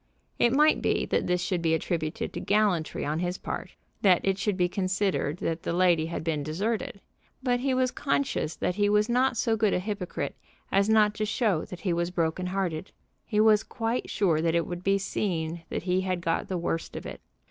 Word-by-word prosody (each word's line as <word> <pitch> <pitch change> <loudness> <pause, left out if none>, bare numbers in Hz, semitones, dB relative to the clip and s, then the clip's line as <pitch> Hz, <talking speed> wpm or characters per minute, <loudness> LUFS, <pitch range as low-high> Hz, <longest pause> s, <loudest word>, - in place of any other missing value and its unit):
It 235 - +4
might 300 +4 +4
be - - +1
that - - 0
this 180 0 +1
should 180 -2 -1
be 160 -1 +2
attributed 160 -1 -2
to - - -4
gallantry 200 -6 +1
on 150 +2 -1
his 180 +1 -2
part, - - -6 0.3
that 185 -4 +5
it 195 0 +1
should 205 -2 0
be 180 -1 +3
considered 185 -4 -1
that 165 -1 -2
the - - -2
lady 175 -3 +3
had 170 - -4
been 160 -2 -1
deserted. 200 +7 -2 0.4
But 245 -2 +2
he 260 +1 0
was 255 -1 +2
conscious 275 - -1
that - - -1
he 205 +2 +2
was 210 +2 +3
not 250 0 +2
so 225 -1 +2
good 215 -2 +2
a - - +1
hypocrite 195 -1 -4 0.4
as 200 +2 +3
not 215 -1 +5
to 215 0 -2
show 210 -7 +1
that 180 - -9
he 185 -4 0
was 170 0 0
broken 175 +1 -1
hearted. 185 -2 -2 0.4
He 210 -2 0
was 215 -1 +6
quite 230 +1 -3
sure 170 -7 +2
that 165 0 +1
it 170 -1 +2
would 175 0 -6
be 195 +1 +3
seen 170 -4 -2
that - - -3
he 180 +1 +1
had 185 -2 -2
got 165 -1 -1
the 185 - -2
worst 165 -1 -3
of - - -6
it. - - -7
185 Hz, 210 wpm, -27 LUFS, 170-210 Hz, 0.4 s, was